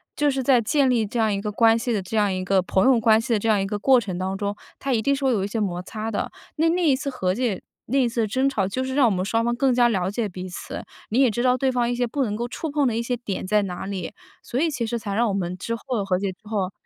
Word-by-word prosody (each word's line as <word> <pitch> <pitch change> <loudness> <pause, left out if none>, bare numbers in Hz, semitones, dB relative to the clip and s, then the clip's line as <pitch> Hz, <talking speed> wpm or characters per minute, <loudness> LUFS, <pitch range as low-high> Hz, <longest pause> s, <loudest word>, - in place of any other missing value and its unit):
就 295 -1 +2
是 265 0 -1
在 255 -1 +4
建 270 +4 +2
立 235 -3 +2
这 225 +3 -3
样 220 -2 +2
一 200 - -2
个 210 0 -3
关 225 +1 +4
系 240 +1 -2
的， 210 -4 0
这 190 +4 -6
样 205 -2 +2
一 185 0 -2
个 190 0 +3
朋 190 +1 +1
友 260 -2 +5
关 220 0 +5
系 235 +1 -1
的 215 - +2
这 225 - -1
样 210 -2 +4
一 195 - 0
个 205 +1 -2
过 255 +5 +5
程 195 -6 -5
当 190 +1 -2
中， 205 0 -2 0.2
它 270 -1 -1
一 225 - +1
定 280 +5 +2
是 275 0 -2
会 265 - +4
有 210 -5 +1
一 - - -1
些 225 +2 -3
摩 180 -4 -1
擦 215 +4 -5
的。 210 - -3 0.2
那 325 +1 +2
那 355 +2 +1
一 275 - +5
次 280 +2 -3
和 185 -8 -1
解、 230 -5 -1 0.3
那 265 - 0
一 260 -3 +4
次 235 0 -1
的 220 - +1
争 260 +6 +1
吵， 210 -8 0
就 195 +7 -2
是 260 0 -3
让 280 -2 +5
我 - - +2
们 185 -1 -1
双 225 +3 +1
方 240 +1 +1
更 255 +1 +2
加 240 -1 +4
了 190 -5 0
解 215 +1 -2
彼 185 0 -7
此。 180 - -7 0.2
你 230 - +1
也 265 -2 +5
知 240 +3 -2
道 255 0 +3
对 265 +1 +1
方 245 -2 +1
一 - - 0
些 245 0 0
不 275 +4 -1
能 210 -5 -2
够 235 +3 -3
触 310 +5 -5
碰 290 -2 +2
的 230 - 0
一 230 - -1
些 245 +1 -2
点 210 -6 -4
在 210 +2 +2
哪 180 -2 -5
里， 190 -3 -5 0.3
所 240 - -5
以 325 +5 +2
其 250 -5 -2
实 235 - -2
才 205 -3 -5
让 235 +3 +2
我 205 - -1
们 180 -2 -2
之 230 +4 -3
后 230 -3 -3
和 185 -2 +1
解 195 -1 -1
之 180 - -17
后， 200 -4 -1
225 Hz, 350 characters per minute, -24 LUFS, 200-255 Hz, 0.3 s, 友